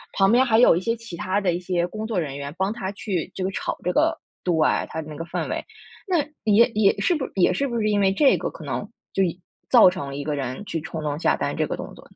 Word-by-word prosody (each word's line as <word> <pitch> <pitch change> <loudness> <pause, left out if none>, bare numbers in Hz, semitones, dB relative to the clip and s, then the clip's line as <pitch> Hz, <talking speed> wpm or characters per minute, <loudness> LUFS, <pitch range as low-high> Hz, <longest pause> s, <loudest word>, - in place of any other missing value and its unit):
旁 195 +1 +4
边 250 +2 +5
还 225 -2 +3
有 245 - +7
一 - - +1
些 230 +5 -1
其 230 -7 -9
他 190 +4 -1
的 185 -3 +2
一 175 - -2
些 175 -1 -1
工 215 +4 -5
作 220 -4 -1
人 140 -4 -4
员 140 +1 -6
帮 190 +2 +1
他 195 -5 -4
去 195 -4 -3
这 185 - -4
个 190 - 0
炒 - - -3
这 180 - +1
个 320 - +2 0.2
对， 180 - +1 0.4
他 160 - -3
的 155 - -10
那 150 - -7
个 165 - -5
氛 170 - -3
围。 - - -3 0.4
那 360 -3 +2 0.2
也 220 +2 +5
也 210 -2 +4
是 350 - +2
不 275 - -2
是 - - -9
也 185 - +3
是 280 - 0
不 240 - -4
是 215 - +1
因 205 -1 +2
为 195 -1 +3
这 275 +6 +4
个 - - -3
可 - - -11
能， - - -4 0.3
就 195 - +2 0.4
造 235 -7 +7
成 180 -6 -5
了 140 - -6
一 145 - -4
个 150 0 -2
人 130 +3 -4
去 165 - -3
冲 160 0 -6
动 150 -1 -2
下 165 - +2
单 - - -3
这 - - +1
个 - - -3
动 - - -6
作。 - - -14
190 Hz, 305 characters per minute, -24 LUFS, 165-220 Hz, 0.4 s, 有